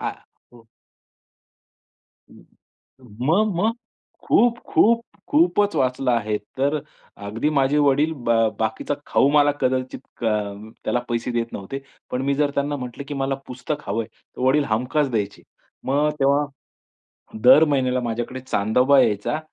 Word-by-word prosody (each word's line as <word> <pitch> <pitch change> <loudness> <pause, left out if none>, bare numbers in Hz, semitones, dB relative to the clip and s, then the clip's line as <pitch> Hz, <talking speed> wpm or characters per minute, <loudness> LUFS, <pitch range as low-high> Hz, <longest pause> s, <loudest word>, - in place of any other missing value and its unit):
आ, - - -2 0.4
हो. 115 -2 -18 1.6
हं. - - -18 0.8
मग-मग. 210 +4 +2 0.5
खूप, 235 -1 +4
खूप, 230 +1 +4 0.3
खूपच 290 - +3
वाचलं 130 0 +1
आहे. 110 -2 0 0.2
तर 140 +3 +1 0.5
अगदी 115 +9 -1
माझे 140 0 +2
वडील 145 +2 +3
ब 120 -6 -6 0.3
बाकीचा 110 +6 -1
खाऊ 140 - +3
मला 145 -1 +5
कदाचित 130 0 -1 0.2
कं 105 -2 -2
त्याला 125 - 0
पैसे 120 +1 -2
देत 115 -1 -2
नव्हते. 105 +8 -6 0.3
पण 125 - -1
मी 140 - +2
जर 145 0 +1
त्यांना 145 +1 0
म्हटलं, 125 0 -6
की 145 - -5
मला 135 -1 -1
पुस्तक 130 +2 -5
हवंय. 110 +2 -1
तर - - -13
वडील 135 +3 +3
हमखास 125 +6 0
द्यायचे. 105 -4 -3 0.4
मग 145 +3 +2
तेव्हा, 140 +2 +3 1.0
दर 145 +5 +8
महिन्याला 130 -3 +1
माझ्याकडे 120 +2 -3
चांदोबा 125 +4 +3
यायचा 110 +6 0
130 Hz, 130 wpm, -22 LUFS, 115-145 Hz, 1.6 s, दर